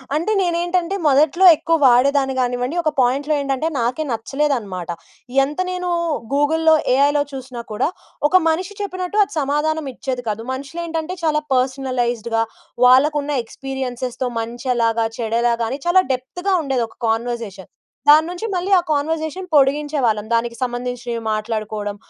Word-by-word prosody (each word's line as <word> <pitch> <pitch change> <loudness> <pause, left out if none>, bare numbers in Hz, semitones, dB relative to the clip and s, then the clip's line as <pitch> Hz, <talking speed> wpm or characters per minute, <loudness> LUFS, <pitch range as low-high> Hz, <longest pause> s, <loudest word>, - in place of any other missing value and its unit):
అంటే, 340 +8 0
నేనేంటంటే, 350 +1 0
మొదట్లో 300 +6 +4
ఎక్కువ 330 +2 +1
వాడేదాన్ని 270 +2 +3
గానివ్వండి. 245 +3 -1
ఒక 310 - +1
పాయింట్‌లో 275 +4 +2
ఏంటంటే, 275 +3 -1
నాకే 250 +6 -1
నచ్చలేదనమాట. 230 - -2 0.5
ఎంత 295 +5 -4
నేను 360 -1 -3 0.4
గూగుల్‌లో, 320 +3 +3 0.2
ఏఐలో 285 +1 +3
చూసినా, 260 -3 -7
కూడా 215 +7 0 0.4
ఒక 360 - -1
మనిషి 365 +5 -1
చెప్పినట్టు, 370 +1 -4
అది - - -8
సమాధానమిచ్చేది 285 -3 -2
కాదు. 215 +1 -2
మనుషులేంటంటే, 325 +5 -4
చాలా 305 -1 +2
పర్సనలైజ్డ్‌గా, 250 -3 0 0.4
వాళ్ళకున్న 290 +3 +4
ఎక్స్పీరియన్సెస్‌తో, 255 0 -4
మంచెలాగా, 230 -1 0
చెడెలాగా 235 0 +1
అని, 270 +4 -4
చాలా 370 +2 +5
డెప్త్‌గా 355 +10 -3
ఉండేది 265 -4 0
ఒక - - -22
కాన్వర్జేషన్. 225 -4 -3 0.4
దాని 310 +2 +8
నుంచి 360 +5 -5
మళ్ళీ 365 +2 -2
ఆ 355 - +2
కాన్వర్జేషన్ 315 +4 -2
పొడిగించేవాళ్ళం. 275 -6 +2
దానికి 235 0 -1
సంబంధించినవి 245 -1 -3
మాట్లాడుకోడం, 215 -1 -3
270 Hz, 120 wpm, -20 LUFS, 240-315 Hz, 0.5 s, దాని